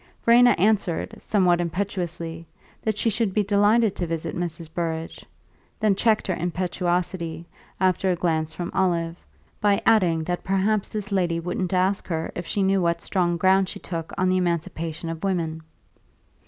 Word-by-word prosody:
Verena 245 Hz, +1 st, +6 dB
answered, 200 Hz, -3 st, +1 dB
somewhat 180 Hz, -4 st, +2 dB
impetuously, 170 Hz, -2 st, -4 dB, 0.3 s
that 215 Hz, -2 st, -1 dB
she 230 Hz, -, 0 dB
should 215 Hz, -3 st, 0 dB
be 210 Hz, -, +3 dB
delighted 205 Hz, +2 st, +3 dB
to 175 Hz, -, -2 dB
visit 165 Hz, -1 st, -3 dB
Mrs. 170 Hz, -1 st, -4 dB
Burrage; 165 Hz, -1 st, -3 dB, 0.6 s
then 215 Hz, -2 st, +3 dB
checked 220 Hz, +1 st, +2 dB
her 185 Hz, -, 0 dB
impetuosity, 175 Hz, -1 st, -2 dB, 0.3 s
after 185 Hz, 0 st, +2 dB
a 180 Hz, -, +2 dB
glance 160 Hz, -2 st, 0 dB
from 175 Hz, +1 st, -5 dB
Olive, 170 Hz, -3 st, +1 dB, 0.5 s
by 205 Hz, -1 st, +3 dB
adding 180 Hz, -8 st, +3 dB
that 175 Hz, +2 st, -3 dB
perhaps 195 Hz, +2 st, +1 dB
this 210 Hz, -1 st, -5 dB
lady 175 Hz, -4 st, +1 dB
wouldn't 180 Hz, +1 st, -3 dB
ask 190 Hz, +1 st, +1 dB
her 165 Hz, -2 st, -2 dB
if 175 Hz, -, -6 dB
she 200 Hz, -, 0 dB
knew 190 Hz, 0 st, +2 dB
what 170 Hz, -1 st, +1 dB
strong 175 Hz, -1 st, 0 dB
ground 190 Hz, +2 st, +3 dB
she -, -, -7 dB
took 165 Hz, -2 st, -5 dB
on 185 Hz, -1 st, +2 dB
the 185 Hz, 0 st, +3 dB
emancipation 170 Hz, -2 st, -2 dB
of 165 Hz, +1 st, -5 dB
women. 165 Hz, -4 st, -1 dB
180 Hz, 160 wpm, -24 LUFS, 170-195 Hz, 0.6 s, Verena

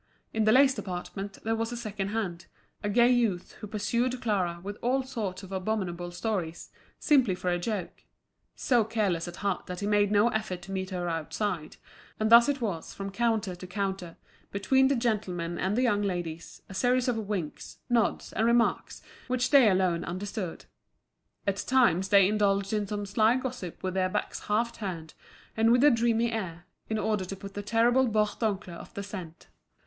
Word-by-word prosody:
In 220 Hz, -1 st, +1 dB
the 215 Hz, -, +5 dB
lace 265 Hz, +2 st, +6 dB
department 195 Hz, -1 st, -6 dB
there 225 Hz, +1 st, 0 dB
was 225 Hz, +1 st, -2 dB
a 240 Hz, -, -4 dB
second 210 Hz, -4 st, -4 dB
hand, 200 Hz, -5 st, -3 dB, 0.3 s
a 205 Hz, -, -2 dB
gay 240 Hz, +4 st, +5 dB
youth 225 Hz, -8 st, +1 dB
who 210 Hz, -, -7 dB
pursued 235 Hz, +4 st, -1 dB
Clara 185 Hz, -7 st, 0 dB
with 205 Hz, +1 st, -6 dB
all 260 Hz, +2 st, +1 dB
sorts 210 Hz, -7 st, -4 dB
of 190 Hz, -, -10 dB
abominable 185 Hz, -3 st, -2 dB
stories, 175 Hz, -3 st, -3 dB, 0.3 s
simply 260 Hz, -, +3 dB
for 180 Hz, 0 st, -2 dB
a 175 Hz, -, 0 dB
joke—so 220 Hz, +4 st, -3 dB
careless 200 Hz, -7 st, 0 dB
at 175 Hz, -, -7 dB
heart 200 Hz, -2 st, -2 dB
that 180 Hz, 0 st, -5 dB
he 200 Hz, -, -3 dB
made 205 Hz, -1 st, +3 dB
no 210 Hz, +3 st, +4 dB
effort 215 Hz, -6 st, -3 dB
to 195 Hz, -, -9 dB
meet 190 Hz, -1 st, -3 dB
her 180 Hz, -2 st, -3 dB
outside; 165 Hz, +1 st, -3 dB, 0.4 s
and 215 Hz, +1 st, +1 dB
thus 235 Hz, +3 st, +8 dB
it 285 Hz, -2 st, -1 dB
was 190 Hz, -8 st, -3 dB
from 195 Hz, 0 st, -5 dB
counter 220 Hz, -3 st, 0 dB
to 180 Hz, +1 st, -9 dB
counter, 190 Hz, -2 st, -3 dB, 0.3 s
between 265 Hz, +7 st, +3 dB
the 275 Hz, -, +2 dB
gentlemen 190 Hz, -8 st, -1 dB
and 195 Hz, +4 st, 0 dB
the 255 Hz, -, +3 dB
young 210 Hz, -5 st, +2 dB
ladies, 175 Hz, -5 st, -4 dB
a -, -, -10 dB
series 250 Hz, +5 st, +2 dB
of 250 Hz, -, +2 dB
winks, 180 Hz, -8 st, -4 dB
nods, 240 Hz, -2 st, +1 dB
and 225 Hz, -, +1 dB
remarks, 235 Hz, 0 st, +1 dB, 0.2 s
which 255 Hz, -1 st, 0 dB
they 270 Hz, -6 st, +7 dB
alone 185 Hz, -3 st, +2 dB
understood. 185 Hz, 0 st, -5 dB, 0.8 s
At 200 Hz, -1 st, 0 dB
times 195 Hz, -8 st, +2 dB
they 200 Hz, -2 st, +6 dB
indulged 200 Hz, -1 st, +1 dB
in 210 Hz, -1 st, 0 dB
some 205 Hz, 0 st, -3 dB
sly 220 Hz, +3 st, +3 dB
gossip 255 Hz, -9 st, -5 dB
with 185 Hz, -1 st, -1 dB
their 185 Hz, -1 st, +1 dB
backs -, -, -3 dB
half 230 Hz, +3 st, +1 dB
turned 180 Hz, -8 st, -6 dB, 0.4 s
and 225 Hz, +1 st, +4 dB
with 245 Hz, +2 st, +5 dB
a 295 Hz, -, +8 dB
dreamy 230 Hz, 0 st, +2 dB
air, 175 Hz, -6 st, -4 dB, 0.2 s
in 220 Hz, -, 0 dB
order 215 Hz, -2 st, 0 dB
to 195 Hz, -, -6 dB
put 195 Hz, +1 st, -9 dB
the 205 Hz, -, -4 dB
terrible 235 Hz, +5 st, +3 dB
Bourdoncle 210 Hz, -4 st, -1 dB
off -, -, -12 dB
the 200 Hz, -, -4 dB
scent. 180 Hz, -5 st, -8 dB
205 Hz, 185 wpm, -28 LUFS, 185-230 Hz, 0.8 s, thus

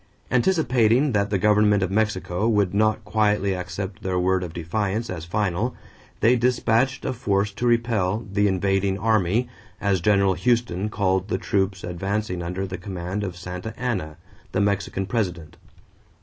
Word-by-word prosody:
Anticipating 125 Hz, -, +3 dB
that 100 Hz, -2 st, +1 dB
the 100 Hz, -, +1 dB
government 105 Hz, 0 st, +3 dB
of 95 Hz, -, -2 dB
Mexico 105 Hz, -1 st, 0 dB
would 100 Hz, -4 st, +2 dB
not 110 Hz, +1 st, +1 dB
quietly 105 Hz, -2 st, +1 dB
accept 90 Hz, +1 st, -5 dB
their 95 Hz, -1 st, -1 dB
word 95 Hz, +1 st, +2 dB
of 90 Hz, -, -5 dB
defiance 100 Hz, +7 st, -2 dB
as 85 Hz, -3 st, -5 dB
final, 105 Hz, +5 st, -1 dB, 0.5 s
they 120 Hz, +3 st, +5 dB
dispatched 125 Hz, +1 st, +1 dB
a -, -, -1 dB
force 100 Hz, -4 st, 0 dB
to 120 Hz, +5 st, -2 dB
repel 115 Hz, -3 st, +1 dB
"the 105 Hz, +1 st, +3 dB
invading 95 Hz, 0 st, +1 dB
army," 110 Hz, +2 st, +1 dB, 0.3 s
as 100 Hz, -3 st, +1 dB
General 100 Hz, 0 st, +3 dB
Houston 110 Hz, -3 st, 0 dB
called 95 Hz, -2 st, 0 dB
the 95 Hz, -, -1 dB
troops 95 Hz, -1 st, -1 dB
advancing 90 Hz, +1 st, -2 dB
under 90 Hz, +3 st, -3 dB
the 95 Hz, 0 st, -6 dB
command 95 Hz, +1 st, -4 dB
of 90 Hz, -3 st, -5 dB
Santa 90 Hz, +5 st, -6 dB
Ana, 95 Hz, -11 st, -2 dB, 0.4 s
the -, -, +1 dB
Mexican 100 Hz, -1 st, 0 dB
president. 90 Hz, -7 st, -3 dB
100 Hz, 150 wpm, -24 LUFS, 95-110 Hz, 0.5 s, they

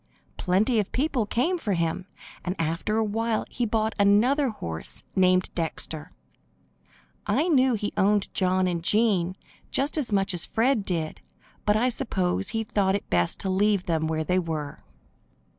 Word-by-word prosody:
Plenty 210 Hz, +6 st, +2 dB
of 205 Hz, -, -2 dB
people 260 Hz, -5 st, 0 dB
came 335 Hz, -, 0 dB
for 205 Hz, -10 st, -1 dB
him, 170 Hz, +2 st, -1 dB, 0.4 s
and 180 Hz, +1 st, -2 dB
after 165 Hz, +7 st, -1 dB
a 225 Hz, -, +2 dB
while 220 Hz, +1 st, -1 dB
he 240 Hz, -2 st, -1 dB
bought 220 Hz, 0 st, 0 dB
another 240 Hz, +8 st, +4 dB
horse 80 Hz, -, -4 dB
named 185 Hz, -1 st, +3 dB
Dexter. 160 Hz, -1 st, -3 dB, 1.2 s
I 325 Hz, -, +2 dB
knew 260 Hz, -6 st, +4 dB
he 205 Hz, -1 st, -3 dB
owned 205 Hz, 0 st, +2 dB
John 185 Hz, 0 st, +2 dB
and 175 Hz, -2 st, -1 dB
Jean 190 Hz, -3 st, +2 dB, 0.3 s
just 285 Hz, +3 st, 0 dB
as 260 Hz, -6 st, -2 dB
much 195 Hz, -1 st, +2 dB
as 175 Hz, -2 st, -2 dB
Fred 230 Hz, 0 st, +1 dB
did, 165 Hz, -4 st, -3 dB, 0.5 s
but 210 Hz, 0 st, +4 dB
I 245 Hz, +3 st, +2 dB
suppose 190 Hz, -5 st, -1 dB
he 225 Hz, 0 st, -1 dB
thought 200 Hz, -2 st, +1 dB, 0.2 s
best 85 Hz, -1 st, +2 dB
to 190 Hz, -, -2 dB
leave 200 Hz, 0 st, +2 dB
them 160 Hz, -2 st, 0 dB
where 160 Hz, 0 st, -1 dB
they 180 Hz, +4 st, +1 dB
were. 155 Hz, -4 st, -5 dB
200 Hz, 160 wpm, -26 LUFS, 180-225 Hz, 1.2 s, another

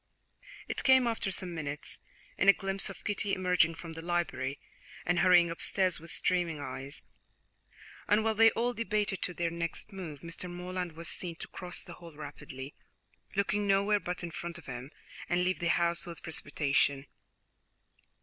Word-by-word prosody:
It -, -, -2 dB
came, 260 Hz, -2 st, +7 dB
after 225 Hz, -4 st, 0 dB
some 185 Hz, -2 st, -3 dB
minutes, 150 Hz, -3 st, -5 dB, 0.4 s
in 195 Hz, -, +4 dB
a -, -, +11 dB
glimpse 195 Hz, 0 st, -2 dB
of 195 Hz, -, -10 dB
Kitty 205 Hz, -1 st, 0 dB
emerging 180 Hz, -3 st, +3 dB
from 165 Hz, 0 st, -8 dB
the 165 Hz, -, -6 dB
library 150 Hz, -6 st, -1 dB, 0.5 s
and 175 Hz, 0 st, +2 dB
hurrying 175 Hz, -2 st, +6 dB
upstairs 185 Hz, +1 st, +2 dB
with 165 Hz, +2 st, -11 dB
streaming 175 Hz, -4 st, +1 dB
eyes, 135 Hz, +1 st, -6 dB, 1.0 s
and 210 Hz, +1 st, +4 dB
while 225 Hz, 0 st, +2 dB
they 225 Hz, +1 st, +7 dB
all 240 Hz, +2 st, +1 dB
debated 210 Hz, -4 st, 0 dB
as -, -, -1 dB
to 180 Hz, -, -5 dB
their 170 Hz, -1 st, 0 dB
next 170 Hz, +4 st, -2 dB
move, 165 Hz, -7 st, -6 dB
Mr. 170 Hz, +2 st, -3 dB
Morland 180 Hz, -1 st, -4 dB
was 165 Hz, +1 st, -7 dB
seen 170 Hz, -1 st, -3 dB
to -, -, -7 dB
cross 180 Hz, -1 st, -6 dB
the 175 Hz, -, -9 dB
hall 170 Hz, -2 st, -12 dB
rapidly, 140 Hz, -2 st, -8 dB, 0.6 s
looking 200 Hz, +1 st, +1 dB
nowhere 200 Hz, +1 st, +4 dB
but 180 Hz, -1 st, -4 dB
in 170 Hz, -, -4 dB
front 170 Hz, +1 st, -5 dB
of 170 Hz, -, -13 dB
him, 125 Hz, +1 st, -6 dB, 0.4 s
and 175 Hz, +1 st, +2 dB
leave 185 Hz, +1 st, +1 dB
the 170 Hz, -, 0 dB
house 170 Hz, 0 st, +2 dB
with 170 Hz, -2 st, -8 dB
precipitation. 140 Hz, -3 st, +1 dB
175 Hz, 170 wpm, -31 LUFS, 165-195 Hz, 1.0 s, a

